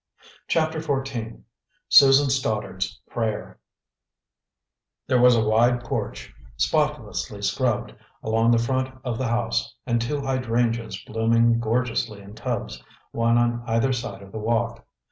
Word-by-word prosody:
CHAPTER 160 Hz, -1 st, +1 dB
XIV 135 Hz, -7 st, -3 dB, 0.5 s
SUSAN 135 Hz, 0 st, +7 dB
STODDARD'S 110 Hz, -5 st, -2 dB
PRAYER 110 Hz, -3 st, -3 dB, 1.5 s
There 125 Hz, -1 st, +2 dB
was 125 Hz, 0 st, +7 dB
a 110 Hz, -1 st, +2 dB
wide 120 Hz, +3 st, +3 dB
porch, -, -, -4 dB, 0.2 s
spotlessly 110 Hz, -, -1 dB
scrubbed, 105 Hz, +4 st, 0 dB, 0.3 s
along 115 Hz, +1 st, +2 dB
the 120 Hz, -, +5 dB
front 130 Hz, +2 st, -1 dB
of 120 Hz, -3 st, -3 dB
the 130 Hz, -, -1 dB
house, 120 Hz, 0 st, -1 dB
and 120 Hz, -2 st, 0 dB
two 145 Hz, +5 st, -2 dB
hydrangeas 115 Hz, -5 st, -1 dB
blooming 115 Hz, +1 st, +2 dB
gorgeously 115 Hz, -2 st, -1 dB
in 100 Hz, +1 st, -12 dB
tubs, -, -, -4 dB, 0.3 s
one 115 Hz, 0 st, +2 dB
on 120 Hz, 0 st, +1 dB
either 115 Hz, +4 st, +1 dB
side 105 Hz, -5 st, -5 dB
of 100 Hz, -, -14 dB
the 110 Hz, -, -5 dB
walk. 115 Hz, +1 st, -1 dB
115 Hz, 125 wpm, -24 LUFS, 110-130 Hz, 1.5 s, SUSAN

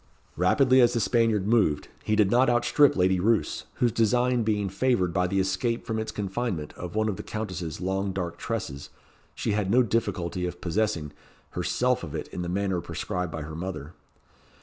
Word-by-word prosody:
Rapidly 130 Hz, -, +4 dB
as 120 Hz, 0 st, +4 dB
the 120 Hz, -, +1 dB
Spaniard 110 Hz, -1 st, +2 dB
moved, 105 Hz, -10 st, +2 dB, 0.2 s
he 110 Hz, -, +1 dB
did 105 Hz, -2 st, +3 dB
not 125 Hz, +1 st, +4 dB
outstrip 120 Hz, +4 st, +4 dB
Lady 95 Hz, 0 st, +2 dB
Roos, 110 Hz, +4 st, +1 dB
whose 120 Hz, -2 st, +2 dB
design 120 Hz, +3 st, +2 dB
being 105 Hz, -2 st, 0 dB
favoured 95 Hz, -3 st, +1 dB
by 90 Hz, -1 st, +1 dB
the 95 Hz, +2 st, 0 dB
escape 95 Hz, +5 st, -1 dB
from 110 Hz, -1 st, -2 dB
its 110 Hz, 0 st, -3 dB
confinement 100 Hz, -5 st, -3 dB
of 90 Hz, +1 st, -8 dB
one 110 Hz, 0 st, +1 dB
of 100 Hz, -4 st, -2 dB
the -, -, -5 dB
Countess's 90 Hz, -7 st, -5 dB
long 95 Hz, +1 st, -1 dB
dark 90 Hz, -3 st, -4 dB
tresses, 70 Hz, +1 st, -4 dB, 0.5 s
she -, -, -1 dB
had 105 Hz, -2 st, 0 dB
no 125 Hz, +5 st, +5 dB
difficulty 95 Hz, -6 st, -1 dB
of 90 Hz, 0 st, -7 dB
possessing, 85 Hz, -5 st, -1 dB, 0.4 s
herself -, -, 0 dB
of -, -, -6 dB
it -, -, -4 dB
in 90 Hz, -, -5 dB
the 85 Hz, -, -3 dB
manner 95 Hz, -1 st, -1 dB
prescribed 90 Hz, +1 st, -4 dB
by 80 Hz, -, -5 dB
her 80 Hz, +1 st, -7 dB
mother. 85 Hz, -3 st, -6 dB
100 Hz, 185 wpm, -26 LUFS, 90-115 Hz, 0.5 s, no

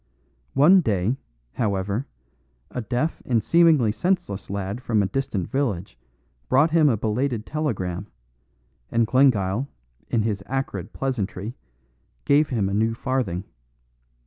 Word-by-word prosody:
One 165 Hz, +8 st, +7 dB
day, 110 Hz, -, 0 dB, 0.4 s
however, 100 Hz, +2 st, -1 dB, 0.6 s
a 125 Hz, -, -3 dB
deaf 125 Hz, +9 st, -2 dB
and 115 Hz, -4 st, +1 dB
seemingly 160 Hz, -7 st, +4 dB
senseless 175 Hz, -, -1 dB
lad 100 Hz, +4 st, -3 dB
from 110 Hz, -5 st, +1 dB
a -, -, +1 dB
distant 105 Hz, -4 st, -2 dB
village 105 Hz, -, -1 dB, 0.5 s
brought 150 Hz, +5 st, +4 dB
him 155 Hz, -2 st, +5 dB
a 115 Hz, -, +2 dB
belated 115 Hz, +2 st, -1 dB
telegram; 100 Hz, -, -2 dB, 0.8 s
and 115 Hz, 0 st, +3 dB
Glengyle, 120 Hz, -2 st, +3 dB, 0.4 s
in 115 Hz, -3 st, +1 dB
his 105 Hz, -3 st, -1 dB
acrid 135 Hz, +1 st, -3 dB
pleasantry, 110 Hz, -5 st, -3 dB, 0.7 s
gave 145 Hz, +1 st, +4 dB
him 110 Hz, -7 st, 0 dB
a 100 Hz, -, -2 dB
new 110 Hz, +2 st, +1 dB
farthing. 120 Hz, -9 st, -1 dB
115 Hz, 120 wpm, -24 LUFS, 100-135 Hz, 0.8 s, One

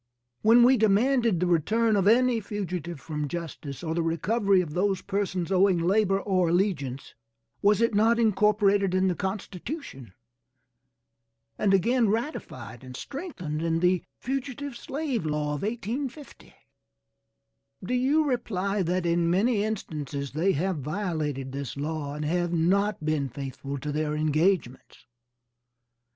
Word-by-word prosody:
When 235 Hz, +2 st, +6 dB
we 255 Hz, +2 st, +6 dB
demanded 225 Hz, -1 st, +3 dB
the 180 Hz, -, +1 dB
return 215 Hz, +7 st, +2 dB
of 195 Hz, -1 st, +2 dB
any 245 Hz, +1 st, +4 dB
fugitive 180 Hz, -6 st, -5 dB
from 150 Hz, 0 st, -4 dB
justice, 160 Hz, -3 st, -6 dB
or 160 Hz, -1 st, -2 dB
the 170 Hz, -, 0 dB
recovery 195 Hz, +5 st, +2 dB
of 165 Hz, -5 st, -2 dB
those 190 Hz, +2 st, 0 dB
persons 195 Hz, -3 st, -2 dB
owing 190 Hz, -1 st, +4 dB
labor 195 Hz, +3 st, +2 dB
or 185 Hz, -4 st, +1 dB
allegiance, 165 Hz, -8 st, -1 dB, 0.5 s
was 205 Hz, +2 st, +3 dB
it 230 Hz, -1 st, +2 dB
not 225 Hz, +3 st, +4 dB
incorporated 205 Hz, -3 st, +3 dB
in 185 Hz, 0 st, +3 dB
the 180 Hz, -, -1 dB
Constitution, 190 Hz, -, -6 dB, 1.4 s
and 200 Hz, -, +1 dB
again 230 Hz, +4 st, +3 dB
ratified 210 Hz, -, -4 dB
and 130 Hz, -1 st, -9 dB
strengthened 190 Hz, -, -5 dB
in 165 Hz, 0 st, 0 dB
the 180 Hz, +1 st, +2 dB
fugitive 270 Hz, +1 st, -4 dB
slave 270 Hz, -, -3 dB
law 150 Hz, -1 st, -1 dB
of 145 Hz, -, -4 dB
1850? 240 Hz, +6 st, -5 dB, 1.3 s
Do 225 Hz, -, -3 dB
you 270 Hz, +5 st, +3 dB
reply 205 Hz, -7 st, -1 dB
that 180 Hz, 0 st, 0 dB
in 170 Hz, 0 st, +2 dB
many 205 Hz, +4 st, +2 dB
instances 150 Hz, -10 st, -4 dB
they 175 Hz, +6 st, +1 dB
have 180 Hz, +4 st, -1 dB
violated 150 Hz, -4 st, -3 dB
this 140 Hz, 0 st, -5 dB
law 145 Hz, -1 st, -3 dB
and 150 Hz, 0 st, -4 dB
have 175 Hz, +2 st, 0 dB
not 185 Hz, +2 st, +1 dB
been 150 Hz, -3 st, 0 dB
faithful 135 Hz, +2 st, -6 dB
to 145 Hz, +2 st, -4 dB
their 150 Hz, 0 st, -1 dB
engagements? 155 Hz, -3 st, 0 dB
185 Hz, 135 wpm, -27 LUFS, 155-220 Hz, 1.4 s, When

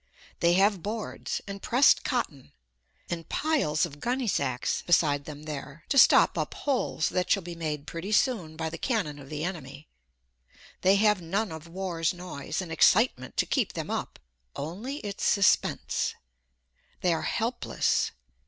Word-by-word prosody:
They 170 Hz, 0 st, +4 dB
have 195 Hz, 0 st, +3 dB
boards, 215 Hz, +2 st, -4 dB
and 200 Hz, 0 st, -6 dB
pressed 255 Hz, +4 st, +4 dB
cotton, 165 Hz, -, -3 dB, 0.5 s
and 165 Hz, -2 st, -5 dB
piles 275 Hz, -, +1 dB
of 145 Hz, -3 st, -10 dB
gunny 250 Hz, -, -1 dB
sacks 130 Hz, -, 0 dB
beside 145 Hz, -5 st, +2 dB
them 150 Hz, -1 st, -9 dB
there, 150 Hz, 0 st, -7 dB
to 275 Hz, -, +1 dB
stop -, -, +6 dB
up -, -, -3 dB
holes 260 Hz, -, 0 dB
that 180 Hz, -1 st, -1 dB
shall 195 Hz, -, +2 dB
be 175 Hz, 0 st, -6 dB
made 155 Hz, -3 st, -4 dB
pretty 170 Hz, +5 st, -6 dB
soon 210 Hz, -, +1 dB
by 160 Hz, 0 st, -3 dB
the 165 Hz, -, -7 dB
cannon 195 Hz, -, -1 dB
of 135 Hz, -1 st, -12 dB
the 150 Hz, 0 st, -4 dB
enemy. 155 Hz, -5 st, -6 dB, 0.9 s
They 190 Hz, +2 st, +5 dB
have 210 Hz, -1 st, +3 dB
none 195 Hz, +5 st, -1 dB
of 160 Hz, +1 st, -8 dB
war's 170 Hz, -2 st, -2 dB
noise 180 Hz, 0 st, -5 dB
and 170 Hz, -, -9 dB
excitement 165 Hz, -, +3 dB
to -, -, +3 dB
keep -, -, 0 dB
them -, -, -4 dB
up -, -, -3 dB, 0.4 s
only 210 Hz, -, -5 dB
its 205 Hz, -1 st, -5 dB
suspense. 200 Hz, -2 st, +2 dB, 0.9 s
They 180 Hz, -2 st, +3 dB
are 160 Hz, -, -1 dB
helpless. 235 Hz, +2 st, 0 dB
175 Hz, 155 wpm, -28 LUFS, 155-210 Hz, 0.9 s, stop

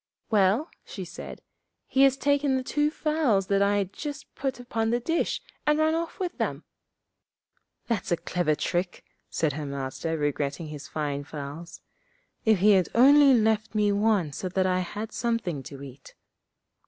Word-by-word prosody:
'Well,' 210 Hz, -, +3 dB
she -, -, -7 dB
said, -, -, -9 dB, 0.4 s
'he 270 Hz, -, +2 dB
has 270 Hz, -1 st, +5 dB
taken 285 Hz, -1 st, +2 dB
the 260 Hz, -, -1 dB
two 295 Hz, +3 st, +1 dB
fowls 300 Hz, -11 st, +1 dB
that 200 Hz, +1 st, +1 dB
I 200 Hz, +1 st, +3 dB
had 195 Hz, -1 st, -2 dB
just 295 Hz, 0 st, -7 dB
put 265 Hz, -2 st, -3 dB
upon 230 Hz, -2 st, -2 dB
the 240 Hz, +1 st, +1 dB
dish, 330 Hz, +8 st, -1 dB, 0.2 s
and 300 Hz, 0 st, +4 dB
run 315 Hz, 0 st, +3 dB
off 330 Hz, 0 st, -3 dB
with 365 Hz, -2 st, -3 dB
them.' -, -, -2 dB, 1.2 s
'That's 230 Hz, -6 st, -2 dB
a 170 Hz, -, +3 dB
clever 170 Hz, -3 st, 0 dB
trick!' 175 Hz, +3 st, -2 dB, 0.2 s
said 155 Hz, -3 st, 0 dB
her 150 Hz, +1 st, -4 dB
Master, 140 Hz, +4 st, -3 dB
regretting 145 Hz, +1 st, -2 dB
his 145 Hz, -2 st, -8 dB
fine 145 Hz, -1 st, -3 dB
fowls. 150 Hz, +2 st, -8 dB, 0.6 s
'If 220 Hz, -2 st, +5 dB
he 210 Hz, +2 st, +6 dB
had 190 Hz, -3 st, +4 dB
only 275 Hz, +2 st, +7 dB
left 220 Hz, 0 st, +1 dB
me 210 Hz, -1 st, +3 dB
one 200 Hz, -6 st, +2 dB
so 185 Hz, -, -4 dB
that 185 Hz, +1 st, +1 dB
I 185 Hz, 0 st, +2 dB
had 210 Hz, +5 st, -5 dB
something 230 Hz, -, -2 dB
to 140 Hz, -1 st, -10 dB
eat.' 135 Hz, -1 st, -12 dB
205 Hz, 165 wpm, -27 LUFS, 160-265 Hz, 1.2 s, only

